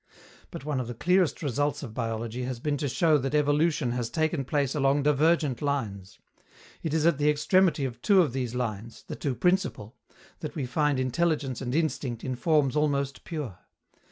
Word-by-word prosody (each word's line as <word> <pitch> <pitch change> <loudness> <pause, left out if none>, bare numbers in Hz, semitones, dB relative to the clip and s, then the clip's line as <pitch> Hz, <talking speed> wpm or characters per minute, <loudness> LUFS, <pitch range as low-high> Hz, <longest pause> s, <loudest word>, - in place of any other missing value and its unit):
But 135 - -8
one 150 -3 -1
of 125 - -3
the 120 - -6
clearest 180 +3 +2
results 145 +1 -1
of 115 -5 -7
biology 115 +1 -3
has 125 -2 -4
been 145 +3 -1
to 145 - -2
show 150 +3 +3
that 135 +3 -2
evolution 150 -2 +2
has 120 -1 -2
taken 155 -2 0
place 140 -1 0
along 140 0 +2
divergent 150 -2 +2
lines. 110 -10 -3 0.6
It 160 - -3
is 160 0 +1
at 170 -4 +3
the 150 +1 +3
extremity 160 0 +3
of 120 -2 -6
two 200 -2 +5
of 145 - -3
these 125 -2 -3
lines 115 -2 -4
the - - -6
two 135 -4 -2
principal 180 - 0 0.4
that 155 - -6
we 145 -5 -2
find 145 +1 +1
intelligence 135 -1 0
and 125 0 -2
instinct 135 -7 -1
in 130 -1 -2
forms 150 0 +2
almost 140 -2 0
pure. 140 - -5
140 Hz, 185 wpm, -27 LUFS, 125-155 Hz, 0.6 s, two